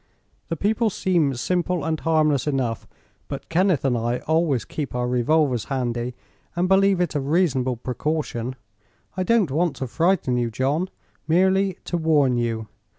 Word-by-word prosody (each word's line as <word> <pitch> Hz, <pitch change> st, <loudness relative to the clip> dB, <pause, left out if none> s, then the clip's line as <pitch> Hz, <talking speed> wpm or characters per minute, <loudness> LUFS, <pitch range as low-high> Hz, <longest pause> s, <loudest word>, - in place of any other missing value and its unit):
The 165 Hz, -, -1 dB
people 220 Hz, +5 st, +1 dB
seem 170 Hz, -8 st, +1 dB
simple 175 Hz, +4 st, -1 dB
and 160 Hz, -1 st, -1 dB
harmless 155 Hz, -4 st, +2 dB
enough, 130 Hz, -6 st, -1 dB, 0.4 s
but -, -, -6 dB
Kenneth 175 Hz, -4 st, +2 dB
and 130 Hz, -2 st, +2 dB
I 120 Hz, +1 st, 0 dB
always 160 Hz, -5 st, +1 dB
keep 145 Hz, -5 st, -5 dB
our 125 Hz, 0 st, 0 dB
revolvers 125 Hz, 0 st, +1 dB
handy, 125 Hz, -2 st, -2 dB, 0.4 s
and 175 Hz, +1 st, +1 dB
believe 195 Hz, 0 st, +4 dB
it 180 Hz, -, +1 dB
is 150 Hz, -, -1 dB
a -, -, -1 dB
reasonable 135 Hz, -5 st, +1 dB
precaution. 130 Hz, -1 st, -3 dB, 0.6 s
I 185 Hz, -, -2 dB
don't 200 Hz, -, +2 dB
want 165 Hz, +3 st, +1 dB
to 130 Hz, -, -4 dB
frighten 160 Hz, -2 st, +1 dB
you, 120 Hz, -1 st, 0 dB
John; 140 Hz, -, -1 dB, 0.4 s
merely 190 Hz, +3 st, +2 dB
to 175 Hz, -, -1 dB
warn 150 Hz, -6 st, +3 dB
you. 115 Hz, -2 st, -2 dB
150 Hz, 155 wpm, -23 LUFS, 125-175 Hz, 0.6 s, believe